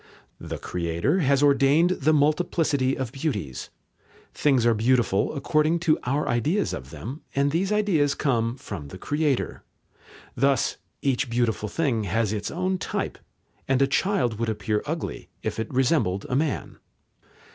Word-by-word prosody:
The - - -5
Creator 85 - -1
has 140 -3 +3
ordained 145 +4 +4
the 155 -4 +2
multiplicity 150 -3 +2
of 130 -3 -3
beauties. 105 - -3 0.6
Things 135 -5 +2
are 120 - +5
beautiful 115 0 +2
according 155 +3 +2
to 160 -3 +3
our 140 +4 0
ideas 155 - +1
of 65 -1 -6
them, 130 - -7
and 140 +1 +2
these 185 +6 0
ideas 180 -10 +2
come 120 -3 0
from 95 - -7
the 95 - -9
Creator. 145 +4 -1 0.7
Thus 135 +1 +2 0.3
each 135 -1 +1
beautiful 115 -3 0
thing 125 -9 0
has 110 +3 0
its 105 -1 -3
own 185 +2 -1
type, - - -3 0.5
and 135 -1 +2
a 135 - +5
child 135 - 0
would 115 -1 0
appear 105 0 -1
ugly - - -4
if - - -3
it 110 - -3
resembled 125 - +1
a 125 - 0
man. 145 +1 -1
135 Hz, 145 wpm, -25 LUFS, 115-155 Hz, 0.7 s, are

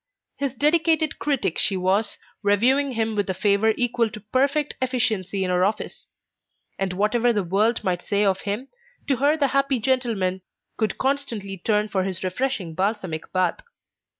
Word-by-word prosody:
His 275 -2 -2
dedicated 315 +2 +2
critic 275 - 0
she 195 - +1
was, 195 +4 +1 0.2
reviewing 250 +7 +3
him 225 -1 -1
with 205 -2 -1
a 190 - -1
favour 205 +3 +3
equal 240 -2 +1
to 215 - -9
perfect 275 +7 0
efficiency 220 -7 0
in 185 - -1
her 180 0 +2
office; 210 +3 -2 0.7
and 190 -1 -1
whatever 215 +5 +2
the 210 -4 0
world 210 +6 +1
might 180 -2 0
say 205 +1 +1
of 195 -1 +1
him, 210 +7 -4 0.4
to 275 -3 +2
her 290 +5 +3
the 280 -3 +2
happy 275 -1 +1
gentleman 225 -7 0 0.3
could 215 -3 -1
constantly 250 -8 -2
turn 210 +3 0
for 190 -3 0
his 185 -1 -4
refreshing 190 -2 -2
balsamic 185 -3 -2
bath. 185 - +1
215 Hz, 160 wpm, -24 LUFS, 195-260 Hz, 0.7 s, reviewing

